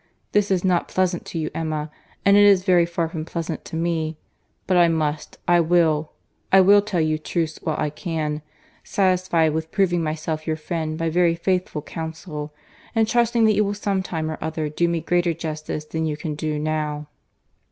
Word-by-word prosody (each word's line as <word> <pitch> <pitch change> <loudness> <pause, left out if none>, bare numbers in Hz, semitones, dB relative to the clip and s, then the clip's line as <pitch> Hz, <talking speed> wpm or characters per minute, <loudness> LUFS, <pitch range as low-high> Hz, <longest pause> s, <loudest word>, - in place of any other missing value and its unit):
—This 205 -1 +2
is 185 -2 +1
not 180 -2 +2
pleasant 185 -2 0
to - - -5
you, 155 -1 -2
Emma—and 155 +5 -1
it 205 - +7
is 200 -2 +6
very 180 -3 +4
far 170 -1 -1
from 160 -1 -5
pleasant 165 -1 -4
to - - -7
me; 160 -1 -1 0.5
but 185 - +1
I 175 -1 +6
must, 155 -2 -1
I 175 0 +5
will,—I 165 +2 +1
will 200 +2 +7
tell 205 -4 -2
you 155 -1 +1
truths 160 0 -2
while 155 - -1
I 150 -1 -1
can; 155 -2 -3 0.4
satisfied 185 -5 +2
with 160 0 -3
proving 180 -4 +2
myself 155 0 -3
your 160 - +1
friend 155 0 -3
by 165 -1 -1
very 170 0 +3
faithful 180 -3 -1
counsel, 160 -2 -6 0.4
and 225 -1 +3
trusting 235 0 +3
that 215 - +5
you 210 - +3
will 205 0 -2
some 200 -2 -1
time 160 -4 -3
or 155 - -6
other 160 -1 -2
do 170 +3 +1
me 170 -1 -1
greater 175 -1 +1
justice 155 -1 -5
than 160 +1 -2
you 150 -1 -2
can 155 -1 -4
do 155 0 -2
now." 150 -1 -2
165 Hz, 185 wpm, -23 LUFS, 155-180 Hz, 0.5 s, it